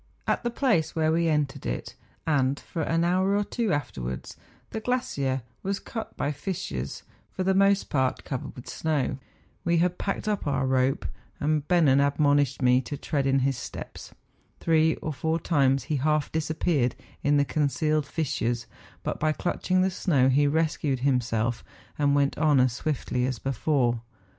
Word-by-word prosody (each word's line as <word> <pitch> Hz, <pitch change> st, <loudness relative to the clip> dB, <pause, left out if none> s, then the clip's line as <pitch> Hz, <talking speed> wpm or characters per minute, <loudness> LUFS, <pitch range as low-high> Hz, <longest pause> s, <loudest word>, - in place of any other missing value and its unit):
At -, -, 0 dB
the 240 Hz, -, 0 dB
place 235 Hz, -, +1 dB
where 160 Hz, -1 st, +2 dB
we 165 Hz, +1 st, +2 dB
entered 150 Hz, -3 st, 0 dB
it, -, -, -4 dB, 0.3 s
and 140 Hz, -3 st, +2 dB
for 165 Hz, -, -5 dB
an 165 Hz, +2 st, +1 dB
hour 185 Hz, +3 st, +2 dB
or 205 Hz, -, +2 dB
two 225 Hz, 0 st, -1 dB
afterwards, 100 Hz, -, -3 dB, 0.4 s
the 220 Hz, -, -3 dB
glacier 140 Hz, -, -1 dB, 0.2 s
was 195 Hz, +1 st, -2 dB
cut 225 Hz, -2 st, -7 dB
by 145 Hz, -, 0 dB
fissures, 145 Hz, -, -4 dB, 0.3 s
for 185 Hz, -, -3 dB
the 190 Hz, +1 st, +2 dB
most 195 Hz, +1 st, +3 dB
part 130 Hz, -3 st, +1 dB
covered 130 Hz, -3 st, -5 dB
with 125 Hz, -, -10 dB
snow. 150 Hz, -4 st, -1 dB, 0.4 s
We 170 Hz, 0 st, +2 dB
had 180 Hz, +1 st, +1 dB
packed 200 Hz, +1 st, -2 dB
up 205 Hz, -6 st, -1 dB
our 135 Hz, -1 st, +1 dB
rope; 130 Hz, +1 st, +1 dB, 0.3 s
and 150 Hz, 0 st, 0 dB
Bennen 155 Hz, -7 st, +4 dB
admonished 140 Hz, -1 st, +2 dB
me 125 Hz, 0 st, +5 dB
to 145 Hz, +3 st, -6 dB
tread 140 Hz, -2 st, -1 dB
in 135 Hz, 0 st, +3 dB
his 135 Hz, -1 st, +1 dB
steps. -, -, -8 dB, 0.5 s
Three 160 Hz, -1 st, +3 dB
or 155 Hz, -, -2 dB
four 160 Hz, +5 st, -1 dB
times 135 Hz, -5 st, +2 dB
he 150 Hz, -, -1 dB
half 150 Hz, +2 st, +1 dB
disappeared 155 Hz, -4 st, 0 dB, 0.3 s
in 145 Hz, +1 st, +3 dB
the 145 Hz, -, +3 dB
concealed 150 Hz, +1 st, 0 dB
fissures, 120 Hz, -7 st, -1 dB, 0.4 s
but -, -, -3 dB
by 155 Hz, 0 st, +2 dB
clutching 185 Hz, +3 st, 0 dB
the 190 Hz, -, +1 dB
snow 140 Hz, -8 st, +2 dB
he 145 Hz, +2 st, +4 dB
rescued 150 Hz, -3 st, 0 dB
himself 120 Hz, -3 st, 0 dB, 0.4 s
and 145 Hz, -1 st, +3 dB
went 140 Hz, 0 st, +1 dB
on 150 Hz, -3 st, +4 dB
as 125 Hz, -2 st, +3 dB
swiftly 130 Hz, -3 st, -1 dB
as 130 Hz, -2 st, -2 dB
before. 125 Hz, -2 st, 0 dB
145 Hz, 165 wpm, -27 LUFS, 130-165 Hz, 0.5 s, me